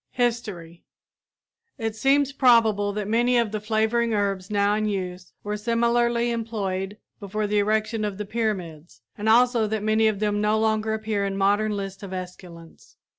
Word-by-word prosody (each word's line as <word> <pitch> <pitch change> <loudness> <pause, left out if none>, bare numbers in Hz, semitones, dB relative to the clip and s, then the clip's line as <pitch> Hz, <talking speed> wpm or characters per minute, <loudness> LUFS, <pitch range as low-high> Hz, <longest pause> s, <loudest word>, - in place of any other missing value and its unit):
HISTORY 215 -9 -3 0.9
It 225 -1 -3
seems 275 +3 +2
probable 225 -6 +4
that 205 0 -4
many 240 +3 +2
of 230 -3 +1
the 215 - -2
flavoring 220 +2 0
herbs 195 -2 -1
now 205 0 +2
in 215 0 0
use 185 -3 -4
were 210 0 -3
similarly 235 +2 +1
employed 205 -4 -3 0.2
before 210 +1 -3
the 210 0 +1
erection 215 +1 0
of 205 -2 -3
the 210 - -4
pyramids 185 - -4
and 210 +1 -2
also 235 -1 +4
that 215 0 -2
many 220 +1 +2
then 220 - +4
popular 205 0 0
no 210 +1 +2
longer 220 0 +1
appear 215 -2 -2
in 195 0 -2
modern 205 +2 +2
lists 195 -1 -6
of 195 -2 -7
esculents. 180 -2 -10
215 Hz, 165 wpm, -24 LUFS, 200-225 Hz, 0.9 s, probable